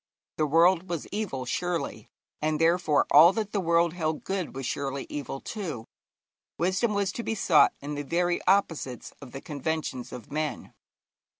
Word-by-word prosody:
The 155 - +1
world 170 +4 +4
was 170 -4 -3
evil, 195 -12 -3
surely, 175 +6 -3 0.3
and 155 0 0
therefore 165 -2 +3
all 160 +4 +9
that 210 -1 -3
the 205 - 0
world 170 -1 +2
held 160 -3 -2
good 190 -7 -3
was 135 -1 -4
surely 140 +1 -3
evil 140 -2 -5
too. 160 - -5 0.7
Wisdom 190 +5 +1
was 200 -2 +1
to 235 - -5
be 225 - -2
sought 180 -6 +4
in 145 +1 -5
the 145 - -3
very 175 +4 0
opposites 165 - 0
of 135 -3 -10
the 135 - -7
conventions 150 -3 -4
of 120 - -9
men. 155 0 -3
165 Hz, 165 wpm, -27 LUFS, 145-185 Hz, 0.7 s, all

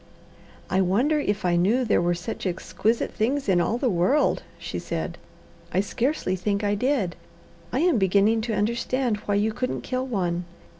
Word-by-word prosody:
"I 190 +1 +2
wonder 240 - +2
if 205 -8 -1
I 175 -1 +3
knew 215 +9 +2
there 220 - +3
were 175 0 +1
such 180 +4 -4
exquisite 210 +5 -1
things 265 +6 -1
in 180 -3 +4
all 220 +7 0
the 255 - 0
world," 225 - +2 0.2
she - - -5
said. - - -4 0.5
"I - - +1
scarcely 230 -1 -1
think 200 +3 -1
I 205 0 +2
did. 210 -5 0 0.6
I 260 - 0
am 340 -8 +3
beginning 200 +4 +3
to 230 - -2
understand 235 +2 0
why 205 - +2
you 215 +2 +1
couldn't 255 +2 -2
kill 255 +1 -2
one. 180 -6 -1
210 Hz, 170 wpm, -25 LUFS, 185-250 Hz, 0.6 s, in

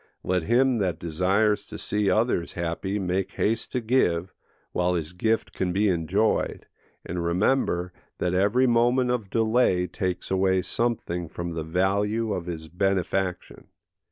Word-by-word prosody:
Let 90 -1 +1
him 120 +6 +2
that 95 -4 0
desires 95 +6 +1
to - - -8
see 105 -1 0
others 110 -6 +1
happy 85 +4 -2
make 95 -1 -1
haste 115 +2 -1
to 125 - 0
give, 90 -7 +1 0.4
while 90 0 +1
his 85 0 -3
gift 110 +5 0
can 90 -1 -1
be 100 +3 +2
enjoyed, 80 -4 0 0.4
and 85 0 -3
remember 90 0 +1 0.2
that 90 0 -1
every 105 +8 +3
moment 120 +1 +3
of 115 -6 -2
delay 110 -5 +2
takes 90 +1 -3
away 95 -1 +2
something 95 -7 -2
from 85 +1 -5
the 80 - -3
value 100 +6 0
of 90 -2 -4
his 80 -2 -5
benefaction. 95 +1 -1
95 Hz, 145 wpm, -26 LUFS, 90-110 Hz, 0.4 s, every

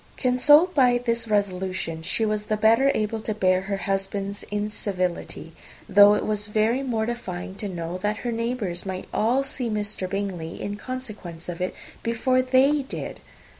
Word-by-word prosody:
Consoled 295 +8 +5
by 250 -4 +4
this 235 -1 -1
resolution, 185 -5 -1
she 220 +7 0
was 210 -1 -1
the 215 0 0
better 230 +6 +4
able 215 +1 -1
to 215 -1 -3
bear 185 -2 +3
her 195 +1 -3
husband's 195 +1 -3
incivility; 200 -5 -3 0.3
though 205 +1 +7
it - - -1
was 210 -1 0
very 220 +4 +1
mortifying 220 -7 -3
to 205 +1 -5
know 175 0 -4
that 210 +2 -1
her 240 - 0
neighbours 230 -6 -2
might 190 -1 -5
all 245 +5 +2
see 270 -3 -2
Mr. 210 -3 -2
Bingley, 190 -5 -4
in 205 - -4
consequence 210 -9 -6
of 175 0 -5
it, 185 - -2 0.3
before 255 +3 +1
they 265 +3 +3
did. 270 - -6
210 Hz, 160 wpm, -25 LUFS, 190-240 Hz, 0.3 s, though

